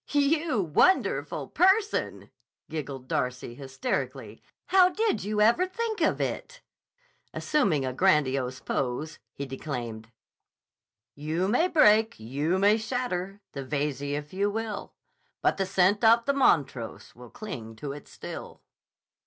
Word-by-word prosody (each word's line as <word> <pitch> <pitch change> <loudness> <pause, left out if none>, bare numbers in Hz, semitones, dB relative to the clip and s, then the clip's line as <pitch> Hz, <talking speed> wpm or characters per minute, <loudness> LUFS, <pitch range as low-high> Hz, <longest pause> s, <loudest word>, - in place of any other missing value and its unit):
"You 290 -2 +2
wonderful 175 - +2
person!" 395 +4 +1 0.4
giggled 140 -4 -5
Darcy 125 -2 -2
hysterically. 135 - -4 0.3
"How 370 -1 +6
did 430 +3 0
you 210 +1 -1
ever 235 +13 +4
think 440 +3 -3
of - - +2
it!" - - -4 0.7
Assuming 195 - +1
a 130 - -2
grandiose 135 -6 +2
pose 140 +5 -3 0.2
he 140 - -4
declaimed: 120 -5 -6 1.0
You 155 +6 -2
may 250 - +3
break, 220 -10 +4
you 140 +10 -1
may 205 +3 +4
shatter, 210 -5 -3
the 140 - -6
Veyze 140 0 -2
if 145 +2 -4
you 200 +2 +1
will, 220 -1 -5 0.5
But - - +2
the 195 -1 -1
scent 190 +4 +2
of 230 +1 +5
the 280 - +2
Montrose 140 - +1
will 125 0 -13
cling 115 - -8
to 140 +5 -6
it 145 +1 -9
still. - - -9
185 Hz, 130 wpm, -27 LUFS, -, 1.0 s, How